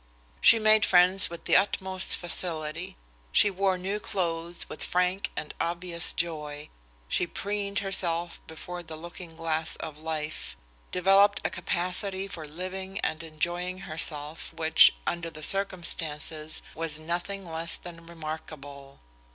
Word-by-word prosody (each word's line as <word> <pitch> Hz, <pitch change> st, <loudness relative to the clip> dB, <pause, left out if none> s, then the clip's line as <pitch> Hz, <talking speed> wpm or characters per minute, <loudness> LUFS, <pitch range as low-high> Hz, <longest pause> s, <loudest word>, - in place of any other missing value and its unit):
She 230 Hz, -, +8 dB
made 215 Hz, -1 st, +5 dB
friends 185 Hz, +1 st, +5 dB
with 170 Hz, 0 st, -9 dB
the -, -, +4 dB
utmost 190 Hz, -1 st, +2 dB
facility. 170 Hz, +1 st, -3 dB, 0.3 s
She 205 Hz, -, +5 dB
wore 190 Hz, 0 st, +1 dB
new 195 Hz, +3 st, -2 dB
clothes 170 Hz, -4 st, -3 dB
with -, -, -6 dB
frank 180 Hz, +2 st, +1 dB
and 150 Hz, -, -4 dB
obvious 170 Hz, 0 st, -1 dB
joy. 150 Hz, -3 st, -3 dB, 0.4 s
She 175 Hz, -, +1 dB
preened 200 Hz, +2 st, -2 dB
herself 175 Hz, -3 st, -1 dB
before 175 Hz, +2 st, -7 dB
the 160 Hz, -2 st, -8 dB
looking 170 Hz, +1 st, -9 dB
glass 160 Hz, -1 st, 0 dB
of 155 Hz, -2 st, -7 dB
life, 155 Hz, -1 st, -4 dB, 0.3 s
developed 195 Hz, +3 st, +5 dB
a 160 Hz, -, +1 dB
capacity 185 Hz, +2 st, +1 dB
for 165 Hz, -5 st, -7 dB
living 190 Hz, +5 st, -5 dB
and 160 Hz, -, -1 dB
enjoying 175 Hz, +3 st, -2 dB
herself 155 Hz, -1 st, -1 dB
which, 160 Hz, -1 st, +7 dB
under 170 Hz, -1 st, -2 dB
the 155 Hz, -1 st, -10 dB
circumstances, 160 Hz, -5 st, -1 dB
was 160 Hz, -2 st, -2 dB
nothing 175 Hz, +5 st, -3 dB
less 165 Hz, 0 st, -1 dB
than 165 Hz, -1 st, -11 dB
remarkable. 155 Hz, -4 st, -8 dB
170 Hz, 130 wpm, -28 LUFS, 160-185 Hz, 0.4 s, She